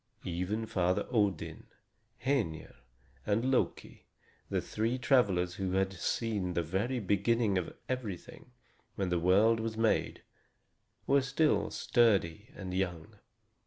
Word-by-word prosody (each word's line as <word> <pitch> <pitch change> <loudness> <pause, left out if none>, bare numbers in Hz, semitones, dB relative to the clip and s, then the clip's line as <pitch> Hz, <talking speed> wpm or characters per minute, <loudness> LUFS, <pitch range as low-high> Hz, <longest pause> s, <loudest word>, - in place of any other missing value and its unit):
Even 90 +6 -2
Father 90 -5 0
Odin, 105 -8 -1 0.6
Hœnir, 110 - -1 0.5
and 115 +5 +1
Loki, 130 - -1 0.4
the - - 0
three 115 +4 -1
travelers 100 -10 +2
who 95 -1 -1
had 95 0 +1
seen 95 -1 -2
the 85 - +1
very 100 +10 -1
beginning 105 +1 +1
of 85 - -6
everything, 125 -2 -5 0.5
when 95 -2 -1
the 90 -1 +1
world 100 +6 +4
was 110 0 -3
made, 115 -1 +1 0.8
were 140 0 +4
still 135 +4 +1
sturdy 105 -4 +2
and 95 -2 -6
young. 90 -4 -3
105 Hz, 120 wpm, -31 LUFS, 90-115 Hz, 0.8 s, world